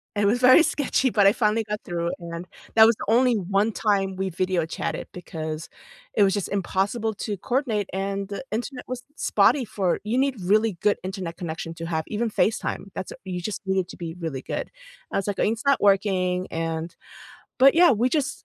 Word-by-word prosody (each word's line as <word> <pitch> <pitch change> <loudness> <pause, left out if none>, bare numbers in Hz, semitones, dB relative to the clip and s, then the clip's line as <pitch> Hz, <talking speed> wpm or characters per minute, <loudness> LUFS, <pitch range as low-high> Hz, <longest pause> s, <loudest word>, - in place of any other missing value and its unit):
It 205 - +1
was 225 +5 +3
very 255 +6 +8
sketchy, 270 -4 +1
but 205 -3 +3
I 195 - +8
finally 220 0 +1
got 210 0 -4
through, 170 -1 -2
and 170 0 -7 0.3
that 220 0 +9
was 230 -1 +4
the - - -6
only 240 +2 +4
one 200 +3 +1
time 195 -3 0
we 190 0 -1
video 185 -1 0
chatted 165 - -4
because 160 -2 -6 0.4
it 205 - +4
was 195 -1 +3
just 205 - -2
impossible 200 +3 -1
to 205 0 -4
coordinate, 240 -4 -1
and 195 0 -2
the 205 +5 -6
internet 245 +3 -4
was 255 0 -5
spotty 275 - +3
for 190 -5 -1
you 225 +4 -1
need 270 -1 +2
really 215 +3 +2
good 205 - +3
internet 185 -3 -5
connection 165 -1 -5
to 165 0 -6
have, 160 -1 -1
even 225 +2 -1
FaceTime, 210 -2 -1
that's 190 - -5
a - - -10
you 180 -2 -4
just 215 +3 -4
need 190 0 +1
it 180 - -2
to - - -9
be 165 -2 -5
really 155 -6 -4
good. - - -4 0.4
I - - +1
was 195 - -2
like, 200 - -2
"Uh - - +3
it's 225 +1 0
not 280 - +4
working," 185 -2 +2
and, 165 +1 -3 0.7
but, 270 +3 +7
yeah, 350 -4 +7
we 235 +4 +2
just 305 +1 -2
200 Hz, 210 wpm, -24 LUFS, 180-225 Hz, 0.7 s, that